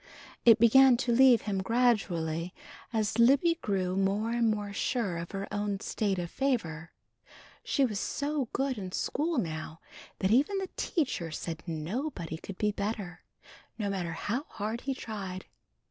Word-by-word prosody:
It 230 -2 +8
began 250 +2 +7
to 240 0 0
leave 250 -1 +6
him 195 -2 -1
gradually 185 -7 0 0.4
as 220 0 0
Libby 280 +8 +5
grew 185 -3 -1
more 200 +4 +1
and 235 -1 +2
more 205 -2 -2
sure 200 -5 -1
of 170 0 -5
her 195 0 -4
own 205 -1 -1
state 200 -2 -1
of 175 -1 -4
favor. 170 - -1 0.7
She 275 - +2
was 210 -5 -2
so 285 -3 -2
good 265 -4 -1
in 185 -2 -6
school 320 +2 -1
now 160 -5 -3 0.4
that 190 - 0
even 290 - +3
the 385 -1 -3
teacher 265 - -1
said 160 +1 -5
nobody 170 - -4
could 185 +3 -9
be 210 -1 +1
better, 200 -3 -4 0.6
no 205 -3 -1
matter 175 -4 -3
how 230 - -2
hard 220 +3 -4
he 270 -1 -2
tried. 195 -6 -6
210 Hz, 155 wpm, -30 LUFS, 185-250 Hz, 0.7 s, It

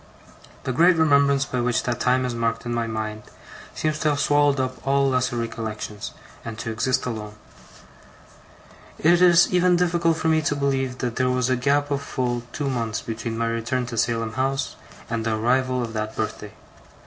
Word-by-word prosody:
The 130 - -2
great 170 +7 +5
remembrance 140 -3 +3
by 125 -2 -2
which 120 -1 +1
that 120 -2 -2
time 130 0 +2
is 125 - -2
marked 115 0 -1
in 120 - -2
my 115 -1 -1
mind, 110 -1 -4 0.5
seems 155 -1 -1
to 155 - +2
have 145 -1 0
swallowed 145 -1 +3
up 130 0 -2
all 140 0 +3
lesser 130 -2 0
recollections, 110 -3 -5 0.3
and 115 -1 -6
to 115 - -4
exist 125 +4 0
alone. 105 -3 -5 1.6
It 170 +3 +4
is 175 0 +6
even 180 0 +4
difficult 170 -2 +2
for 160 - -1
me 160 0 +3
to 145 -1 0
believe 135 -2 -1
that 120 -2 -3
there 130 -1 +2
was 125 0 +1
a - - +3
gap 145 +3 +1
of 140 -1 0
full 125 -4 -2
two 145 - -3
months 115 -4 -2
between 115 0 -4
my 115 - 0
return 115 +2 -1
to 120 -1 -6
Salem 115 -1 0
House 135 +2 -1 0.3
and 115 -1 -2
the 110 -1 0
arrival 125 +3 +1
of 115 -1 -5
that 110 0 -3
birthday. 105 -1 -4
125 Hz, 185 wpm, -23 LUFS, 115-140 Hz, 1.6 s, is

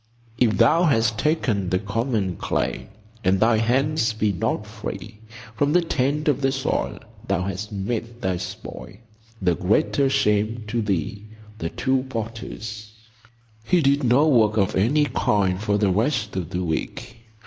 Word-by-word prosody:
"If 110 -5 +3
thou 160 - +5
hast 110 -7 +2
taken 115 - 0
the 90 - +2
common 100 -1 -1
clay, - - -2 0.4
And 95 0 +3
thy 110 +1 +4
hands 120 +2 +1
be 110 -1 +1
not 95 +4 -1
free 105 0 -7 0.4
From 145 +4 +1
the 175 0 +4
taint 150 0 0
of 140 -2 +2
the 135 0 +2
soil, 135 0 -1 0.3
thou 90 - 0
hast 100 +2 -4
made 115 +4 -4
thy 95 -7 -1
spoil 85 +1 -8 0.5
The 90 -1 +3
greater 105 +8 +2
shame 110 -3 +1
to 115 +1 0
thee."—The 105 0 -4
Two 130 +6 0
Potters. 110 -2 -6 0.7
He 175 +10 +3
did 140 +1 +3
no 130 +5 +4
work 110 -6 +4
of 100 -3 +1
any 140 +10 +3
kind 95 -8 +1
for 105 -1 +1
the 100 -2 +2
rest 105 0 0
of 90 -4 -3
the 90 0 -2
week. 85 +6 -4
110 Hz, 150 wpm, -23 LUFS, 100-130 Hz, 0.7 s, thou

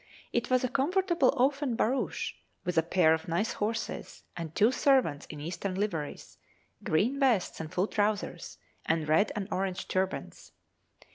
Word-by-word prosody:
It 240 0 0
was 255 0 +3
a - - +2
comfortable 340 +2 +2
open 270 0 +2
barouche, 255 +4 0 0.3
with 180 - -1
a 165 - +5
pair 165 -1 +4
of 160 0 -3
nice 175 +7 0
horses, 225 +2 -4
and 165 -2 -6
two 220 +4 +5
servants 260 - +2
in 150 - -8
Eastern 180 +5 -4
liveries, 180 -7 -4 0.4
green 230 - +1
vests 245 -9 +2
and 160 -1 -6
full 185 +1 +1
trousers, 210 -1 -2 0.3
and 160 -1 0
red 160 +7 +3
and 200 -2 -3
orange 190 -1 -2
turbans. 190 0 -3
205 Hz, 150 wpm, -30 LUFS, 170-255 Hz, 0.4 s, a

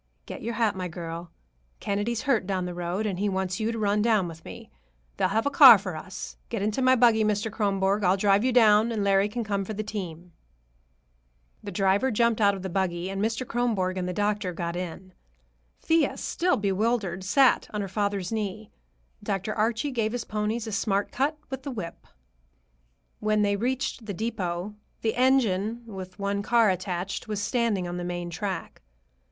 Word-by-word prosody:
"Get - - -8
your 235 0 -3
hat, 225 -4 +1
my 185 -1 -3
girl. 170 0 -7 0.5
Kennedy's 205 +3 -2
hurt 235 -9 +1
down 190 -2 -1
the 180 - -4
road, 175 +4 -3
and 190 -4 -2
he 205 +1 +1
wants 190 -1 -2
you 220 +1 0
to 230 - -4
run 210 -1 +1
down 215 -5 +2
with 160 -1 -10
me. 90 - -11 0.5
They'll - - +2
have 220 +4 0
a 285 - +1
car 265 -5 +10
for 185 -4 -6
us. 185 +4 -8
Get 225 -4 -2
into 215 +5 -1
my 255 0 +5
buggy, 230 -3 +4
Mr. 210 +1 0
Kronborg. 200 -1 0
I'll 185 +1 +3
drive 200 +1 +3
you 255 - +2
down, 220 -2 +5
and 215 -3 -1
Larry 195 +1 +3
can 235 +2 -3
come 200 -2 -1
for 215 +2 -6
the 215 - -3
team." 180 -5 -6 1.3
The 205 - -7
driver 195 +6 +2
jumped 235 -1 +2
out 200 -1 +4
of 190 - -8
the - - -2
buggy 180 0 -1
and 195 0 -3
Mr. 225 +4 -1
Kronborg 220 -6 0
and 180 -1 -2
the - - -1
doctor 205 -1 -1
got 170 0 -4
in. 180 +1 -6 0.7
Thea, 325 -1 +2
still 360 +1 0
bewildered, 200 -2 0
sat 250 +7 +4
on 210 - -2
her 200 - -3
father's 200 -1 -2
knee. 215 -1 -4 0.5
Dr. 205 0 -2
Archie 230 +6 0
gave 225 -3 -1
his 245 -2 -3
ponies 215 +2 -2
a 220 - -5
smart 200 0 0
cut 290 +4 0
with 265 -1 -4
the 280 - -6
whip. 200 -10 -7 1.1
When 215 0 +1
they 200 0 +2
reached 245 +1 -2
the 200 - -4
depot, 195 -3 -3 0.3
the 220 - 0
engine, 235 -4 +2
with 190 -4 -9
one 200 0 -1
car 230 -1 +4
attached, 185 +2 -4
was 210 -2 -3
standing 210 -4 0
on 175 0 -4
the 175 - -4
main 175 0 -4
track. 185 -1 -5
205 Hz, 190 wpm, -26 LUFS, 185-225 Hz, 1.3 s, car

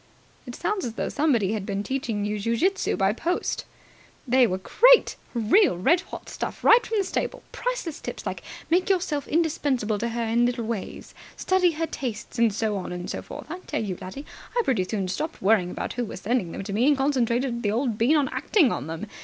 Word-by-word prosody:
"It - - -6
sounds 420 -3 -1
as 235 - -3
though - - -2
somebody 255 -10 +2
had 215 -3 -2
been 200 0 -3
teaching 230 -5 -2
you 210 0 -2
ju 230 +3 0
jitsu 385 +6 +1
by 195 0 +2
post." 340 +10 -2 0.6
"They 255 0 +5
were 185 - -1
great! - - +5 0.2
Real 235 - +4
red 335 - +3
hot - - -10
stuff - - -5
straight 470 - +5
from 445 - -1
the 400 - +2
stable. - - -3
Priceless - - -3
tips - - -6
like - - -4 0.3
'Make 360 +3 +3
yourself 350 -7 0
indispensable 290 -9 0
to 235 +2 -1
her 235 0 -2
in 235 +2 +2
little 240 -2 -2
ways', 220 -4 -5 0.2
'Study 365 -2 +2
her 325 +2 -1
tastes', 240 -6 -5
and 230 -2 +4
so 210 0 -1
on 185 - -5
and 180 0 -5
so - - -4
forth. - - -9
I 360 - -5
tell 295 - -3
you, 195 -4 -3
laddie, 270 +11 -7 0.3
I - - +3
pretty 225 - +1
soon 195 -1 -2
stopped 310 - -3
worrying 195 -3 +3
about - - -4
who 245 0 -2
was 190 - -8
sending 220 -6 0
them - - -5
to 195 - -5
me, 235 +6 +2
and 290 -2 +4
concentrated 250 -3 +1
the 210 - 0
old 230 0 -1
bean 250 +8 +4
on 285 -2 +2
acting 290 - +2
on 135 - -3
them. 165 +6 -5
235 Hz, 215 wpm, -25 LUFS, 210-310 Hz, 0.6 s, They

